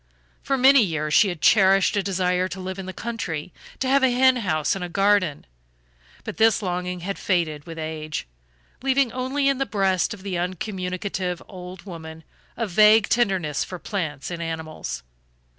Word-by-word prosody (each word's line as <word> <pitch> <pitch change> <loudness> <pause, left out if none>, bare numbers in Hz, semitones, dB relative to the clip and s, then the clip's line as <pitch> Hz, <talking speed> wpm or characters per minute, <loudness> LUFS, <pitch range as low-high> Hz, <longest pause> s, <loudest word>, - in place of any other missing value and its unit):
For 275 - 0
many 265 +1 +7
years 155 -6 -1
she 205 - +6
had 175 -4 -6
cherished 195 -1 +5
a 200 - +2
desire 185 -1 0
to 190 - -7
live 185 +1 -5
in 190 - -6
the - - -4
country, 185 -7 -5 0.2
to 260 - -2
have 275 +1 +4
a 265 - +4
hen 255 +1 +4
house 155 -10 0
and 195 - -4
a 175 - -4
garden; 195 -4 +2 0.8
but - - -7
this 220 -1 +4
longing 180 -1 -3
had 195 +3 -4
faded 160 -6 -1
with 165 -1 -8
age, 155 -1 -4 0.6
leaving 270 -2 +2
only 260 +3 -1
in 275 -1 +2
the 270 - +1
breast 190 -3 +1
of 190 - -16
the 185 -3 -3
uncommunicative 185 0 -3
old 180 -1 -10
woman 160 -4 -9 0.3
a 230 - -1
vague 215 +2 +5
tenderness 190 - +1
for 180 - -7
plants 155 -8 -4
and 170 -1 -5
animals. 160 - -5
185 Hz, 175 wpm, -24 LUFS, 170-215 Hz, 0.8 s, many